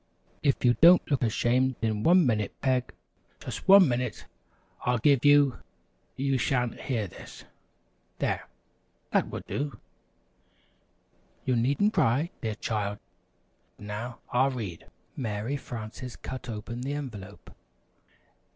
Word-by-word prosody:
If 140 -3 +1
you 120 - +6
don't 175 -1 +7
look 140 - +2
ashamed 120 +3 +1
in 110 -2 0
one 175 +5 +5
minute, 105 -5 -1
Peg, 130 -2 0 0.5
just - - -7
one 195 -2 +9
minute 125 -2 -2 0.6
I'll 125 0 +2
give 135 +2 +3
you, 145 -3 +5 0.6
you 135 -1 0
sha'n't 125 0 0
hear 115 -6 -1
this! 90 - -11 0.7
There, - - -2 0.6
that - - +2
will - - -6
do! 140 -5 -3 1.7
You 130 - +2
needn't 140 - +2
cry, 150 - +2
dear 110 -2 -2
child! 105 -2 -2 0.8
Now, 105 +4 -6
I'll 130 +2 +3
read." 105 -11 -6 0.3
Mary 110 +1 -3
Frances 120 -1 -7
cut 130 -1 -7
open 115 +2 -5
the 135 +3 -3
envelope. 105 -9 -8
125 Hz, 120 wpm, -28 LUFS, 110-140 Hz, 1.7 s, one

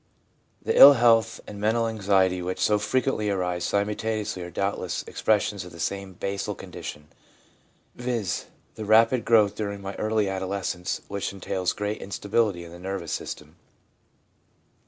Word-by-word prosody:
' - - -41
The - - +1
ill 145 - +11
health 115 -3 +3
and 105 - -9
the - - -8
mental 115 +2 +2
anxiety 95 -4 +1
which 90 +1 -4
so 105 -1 +3
frequently 110 0 0
arise 90 -3 -1
simultaneously 105 -1 -1
are 90 - -6
doubtless 95 -1 -2
expres 105 -2 +1
sions 100 -4 -4
of 90 - -11
the 85 - -12
same 100 +3 -3
basal 100 +2 -3
condition, 75 +1 -9 0.8
viz., 120 -6 -2 0.3
the 110 - -7
rapid 115 +3 +4
growth 110 -3 +4
during 100 -2 -5
early 105 +2 -1
adolescence, 95 -1 -3
which 100 0 -3
entails 95 -1 -2
great 105 +1 -3
instability 100 -1 -1
in 85 - -11
the 85 - -11
nervous 95 -2 -5
system. 75 +3 -6
100 Hz, 150 wpm, -25 LUFS, 95-110 Hz, 0.8 s, ill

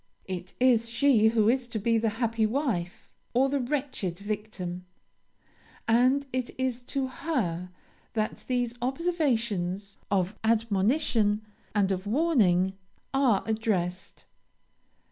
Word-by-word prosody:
It 185 -1 -6
is 240 -3 +4
she 235 -2 +4
who 220 -1 +3
is 250 +1 +2
to 230 - -4
be 225 +2 +2
the 225 0 +1
happy 230 -2 +1
wife, 215 - -2 0.2
or 265 +2 +4
the 280 +1 0
wretched 255 - -2
victim; 200 -3 -5 1.0
and 255 +5 +4
it 255 -1 -1
is 255 -1 -1
to 270 -1 +1
her 225 - -2 0.4
that 215 -1 -2
these 245 -2 0
observations 235 - -1
of 190 0 0
admonition 220 0 +2 0.3
and 200 -2 +3
of 190 +1 -2
warning 205 - +3 0.4
are 260 -7 +3
addressed. 195 -5 -2
225 Hz, 115 wpm, -28 LUFS, 195-255 Hz, 1.0 s, is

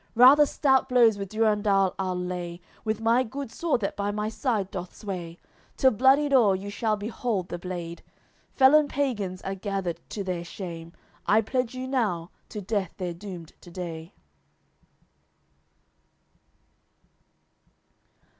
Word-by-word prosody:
Rather 270 +5 +8
stout 265 -2 +2
blows 235 -4 +5
with 195 -1 -4
Durendal 210 -3 +2
I'll 185 -1 -1
lay, 180 -1 -4 0.2
With 220 -1 -1
my 230 +2 +3
good 260 +1 -5
sword 325 -6 0
that 195 - -2
by 200 0 -1
my 210 +1 -2
side 220 -5 -1
doth 180 -1 -6
sway; 175 -5 -6 0.4
Till 260 - +5
bloodied 270 +5 +4
o'er 220 -7 +5
you 200 +2 -6
shall 215 +1 0
behold 210 -2 -3
the 175 - -5
blade. 175 -2 -6 0.5
Felon 290 +3 +6
pagans 210 -11 -2
are 195 - -3
gathered 190 -3 -3
to 205 - -4
their 180 -2 -3
shame; 170 -2 -7 0.4
I 215 +2 +5
pledge 250 +2 -2
you 255 0 -4
now, 205 -11 -1 0.2
to 210 - -6
death 195 -2 -2
they're 180 -3 -3
doomed 175 -2 -9
to 175 - -13
day." 170 -1 -7
205 Hz, 135 wpm, -26 LUFS, 180-245 Hz, 0.5 s, Rather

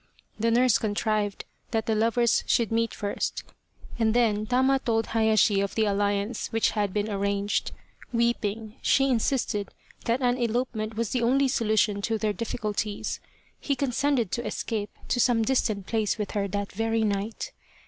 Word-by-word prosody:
The 230 +2 +2
nurse 245 0 +4
contrived 210 -1 -1 0.2
that 225 -2 -1
the 225 - +1
lovers 230 +2 +2
should 230 -2 +2
meet 230 0 +1
first, 205 -1 -3 0.6
and 220 0 +2
then 215 -3 +2
Tama 260 +2 +3
told 225 -3 0
Hayashi 220 -3 +3
of 200 - -3
the 220 - +2
alliance 205 +2 0
which 225 0 +1
had 205 -3 -1
been 210 +2 -1
arranged. 200 0 -1 0.4
Weeping, 225 -1 -1
she 270 -1 +3
insisted 230 -4 0 0.4
that 235 +2 +1
an 245 0 +2
elopement 230 -2 -1
was 230 -1 -2
the 250 - 0
only 265 +4 +3
solution 215 -4 +1
to 225 +2 0
their 215 -1 0
difficulties. 210 -1 -3 0.4
He 280 - -1
consented 265 -4 0
to 240 - -2
escape 210 -3 -3 0.2
to 245 - +1
some 235 -2 +3
distant 215 -5 0
place 220 -1 0
with 210 -2 -3
her 200 -2 -1
that 200 +1 -3
very 225 +2 0
night. 210 - -2
220 Hz, 160 wpm, -27 LUFS, 205-235 Hz, 0.6 s, nurse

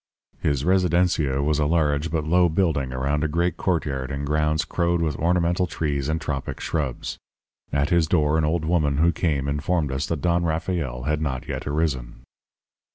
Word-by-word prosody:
"His 70 -1 0
residencia 90 -6 +2
was 75 0 +1
a 75 - +2
large 75 -1 +1
but 80 -1 -1
low 90 +2 +4
building 80 -6 0
around 70 +4 -1
a - - +2
great 85 +3 0
courtyard 70 -8 -1
in 70 +1 -3
grounds 75 +1 +1
crowed 85 0 0
with 80 -4 0
ornamental 85 +1 +1
trees 75 -4 -2
and 80 +1 0
tropic 70 -4 -4
shrubs. 75 -6 -3 0.5
At 70 +1 0
his 85 -3 +3
door 75 -2 +2
an - - +1
old 80 +1 0
woman 75 -4 +1
who 85 +3 +4
came 75 -4 -1
informed 75 +1 0
us 65 +2 -2
that 80 -4 -2
Don 85 0 +2
Rafael 80 -6 -2
had 75 +2 -1
not 65 -4 -3
yet - - -4
arisen. 70 -5 -2
75 Hz, 175 wpm, -24 LUFS, 70-85 Hz, 0.5 s, low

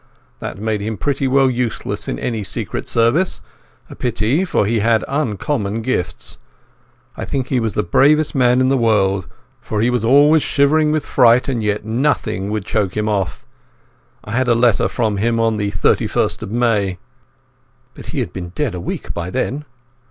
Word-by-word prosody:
That - - -6
made 105 0 -2
him 110 +1 -3
pretty 140 +2 -1
well 135 +1 +4
useless 125 -2 -2
in - - -3
any 115 - -3
Secret 95 - -3
Service—a 120 +11 -2
pity, 125 - 0
for 170 - +1
he 110 +2 +1
had 110 +1 +2
uncommon 115 -5 -2
gifts. 110 -7 -3 0.8
I - - -5
think 130 -2 -3
he 130 - +1
was 110 -3 -2
the - - +1
bravest 145 - +3
man 125 -1 +3
in 130 - +3
the 135 - +2
world, 100 -5 +2 0.3
for 105 - -4
he 120 +3 +2
was 125 -3 0
always 145 +6 +5
shivering 150 +2 +2
with 155 -1 -1
fright, 125 -1 +4
and 125 -4 -1
yet 105 0 -1
nothing 115 -4 -1
would 105 -2 -3
choke 105 -3 -1
him 105 0 0
off. 95 -8 -2 0.8
I 105 - -9
had 130 +3 0
a 120 - +4
letter 120 -2 +3
from 110 -4 -1
him 115 +3 0
on 115 -1 +1
the 105 -1 -1
31st - - 0
of - - -6
May." 105 -5 0 1.0
"But - - -12
he - - -2
had 85 - -5
been 90 -2 -6
dead 145 -9 -1
a 90 - -5
week - - -5
by 85 +1 -4
then." 130 +6 -2
115 Hz, 180 wpm, -18 LUFS, 105-130 Hz, 1.0 s, always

